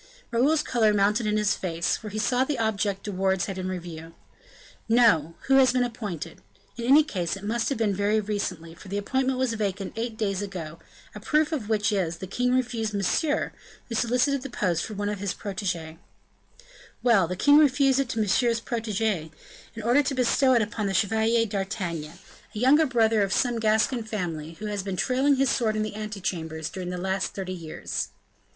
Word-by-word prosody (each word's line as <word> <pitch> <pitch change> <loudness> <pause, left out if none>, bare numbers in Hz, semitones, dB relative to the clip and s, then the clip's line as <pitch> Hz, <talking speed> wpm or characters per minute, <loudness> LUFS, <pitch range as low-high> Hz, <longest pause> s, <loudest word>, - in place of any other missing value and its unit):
Raoul's 290 +6 +3
color 220 -4 +2
mounted 210 +3 +2
in 210 0 +1
his 210 -1 +2
face; 170 -2 -1
for 215 - -7
he 210 - -6
saw 245 +4 +2
the 280 0 -2
object 205 -3 -1
De 205 - -4
Wardes 190 -1 +1
had 195 -2 -5
in 185 0 -3
view. 165 -1 -10 0.7
"No; 180 -10 +4
who 270 0 +4
has 260 -2 +5
been 250 -1 +2
appointed? 205 -9 -5 0.3
In 235 - -5
any 285 +5 +7
case 185 - -3
it 195 - -12
must 225 +2 -1
have 275 - -1
been 215 -3 +1
very 205 +2 +1
recently, 200 -6 -3
for 180 - -14
the 200 +2 -3
appointment 260 +5 0
was 255 -2 0
vacant 200 -3 -3
eight 225 0 -4
days 200 -3 -1
ago; 170 -5 -6 0.3
a 210 - -8
proof 300 +8 +1
of 250 -9 -3
which 210 -2 +1
is, 180 -5 0
that - - -17
the 190 0 -8
king 250 0 +1
refused 230 -4 -1
Monsieur, 290 - 0 0.4
who - - -4
solicited 250 +4 +1
the 275 - -6
post 175 -4 0
for 215 - -6
one 205 +1 -2
of 205 -1 -3
his 200 -2 -2
proteges." 180 -6 -4 1.1
"Well, 220 -8 +4
the 180 - -3
king 290 +10 +6
refused 275 -2 +4
it 275 -3 0
to 225 - -2
Monsieur's 230 +3 +2
protege, 220 - -2 0.5
in 225 - -6
order 245 +6 +4
to 275 -1 -2
bestow 260 +1 +3
it 230 - +4
upon 210 0 -3
the 195 - -1
Chevalier 220 +4 +2
d'Artagnan, 190 -6 -4 0.4
a - - -3
younger 295 +6 +5
brother 225 -4 +3
of 195 -1 0
some 240 +1 +1
Gascon 220 +3 +2
family, 175 -8 -4
who 210 +6 -8
has 205 -1 -2
been 190 -1 -4
trailing 270 +5 +2
his 270 -1 +2
sword 220 -3 +1
in 215 - 0
the 215 - -4
ante 215 -1 -5
chambers 160 -3 -3
during 180 -1 -5
the 180 - -4
last 190 +1 -2
thirty 185 -1 -4
years." 165 -3 -4
215 Hz, 200 wpm, -26 LUFS, 190-240 Hz, 1.1 s, any